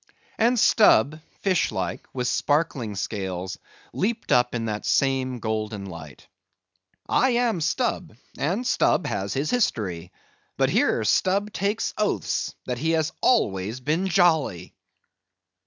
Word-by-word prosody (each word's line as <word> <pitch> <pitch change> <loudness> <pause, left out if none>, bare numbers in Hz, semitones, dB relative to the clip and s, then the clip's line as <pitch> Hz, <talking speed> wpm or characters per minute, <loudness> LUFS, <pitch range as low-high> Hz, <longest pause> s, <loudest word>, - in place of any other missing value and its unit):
And 235 +2 +3
Stubb, 155 - +4 0.2
fish 185 -4 +1
like, - - -4
with 125 -2 -2
sparkling 145 -9 0
scales, 95 -2 -4 0.3
leaped 220 +4 -2
up 125 0 +3
in 115 -1 -2
that 105 -1 -3
same 130 -2 +1
golden 110 -2 -3
light:— 85 -6 -10 0.8
"I 260 - +3
am 235 -7 +1
Stubb, 180 - -1 0.2
and 185 - -1
Stubb 220 - +2
has 100 0 -3
his 140 +3 -1
history; 95 - -1 0.5
but - - +2
here - - +2
Stubb 200 +3 +1
takes 205 +3 -1
oaths 205 - -1
that 125 -1 -3
he 160 +3 0
has 160 0 0
always 110 - +1
been 155 +8 0
jolly!" 160 - +2
135 Hz, 125 wpm, -24 LUFS, -, 0.8 s, Stubb